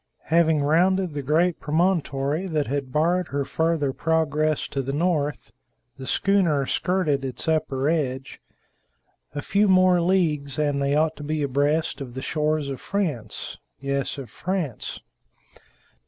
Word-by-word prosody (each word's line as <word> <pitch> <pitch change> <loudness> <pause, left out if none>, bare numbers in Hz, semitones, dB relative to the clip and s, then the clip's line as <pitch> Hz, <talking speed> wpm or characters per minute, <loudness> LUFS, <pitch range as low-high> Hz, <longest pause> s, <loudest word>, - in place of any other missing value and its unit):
Having 160 -3 +4
rounded 180 +3 +2
the 145 - -3
great 160 +5 +2
promontory 155 -1 0
that 155 -4 0
had 135 0 -3
barred 170 +4 +1
her 140 0 -2
farther 160 -3 0
progress 155 -1 +1
to 135 - -2
the 135 +1 -3
north, 150 -3 -1 0.5
the 130 - -7
schooner 175 -8 +2
skirted 165 -4 0
its 130 +1 -4
upper 140 -4 0
edge. 135 -5 -2 0.9
A 145 - -3
few 205 +1 +2
more 185 -2 +5
leagues 155 -7 +1
and 145 -2 +1
they 140 +1 +1
ought 155 +1 +2
to 150 - -8
be 155 0 -1
abreast 145 +3 0
of 125 -3 -7
the 130 - -5
shores 155 -1 0
of 135 -2 -5
France. 150 - -3 0.2
Yes, 140 0 -2
of 130 -6 -8
France. 175 - -3
150 Hz, 140 wpm, -24 LUFS, 140-170 Hz, 0.9 s, more